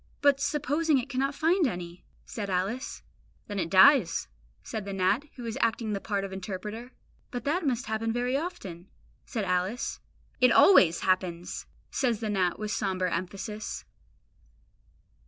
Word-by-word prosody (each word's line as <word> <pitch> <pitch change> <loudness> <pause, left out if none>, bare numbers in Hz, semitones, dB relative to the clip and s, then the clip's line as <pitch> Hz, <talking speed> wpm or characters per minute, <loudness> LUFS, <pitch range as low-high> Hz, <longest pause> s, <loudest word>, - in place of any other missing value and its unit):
"But 285 -1 +4
supposing 295 +2 +1
it 260 +2 -3
cannot 275 +2 -1
find 335 +1 +3
any?" 175 -4 -6 0.2
said 205 -3 -5
Alice. 195 +8 -2 0.4
"Then 205 -2 -4
it 165 -2 -1
dies," 190 - +6 0.4
says 220 - -4
the 200 0 -5
gnat, 195 +8 +1
who 245 - -8
is 230 +3 -4
acting 230 -1 0
the 200 - -3
part 200 -2 -1
of 195 -1 -5
interpreter. 210 +6 -6 0.4
"But 245 -2 -5
that 315 +3 0
must 255 0 0
happen 225 0 -1
very 245 +2 0
often?" 235 - -5 0.4
said 220 -5 -2
Alice. 185 +6 -1 0.4
"It 250 0 +6
ALWAYS 175 - +6
happens!" 180 -2 -1 0.2
says 245 -5 0
the 220 -2 -2
gnat 185 -3 +1
with 215 -1 -4
sombre 185 -4 0
emphasis. 200 +4 -5
215 Hz, 150 wpm, -28 LUFS, 185-260 Hz, 0.4 s, dies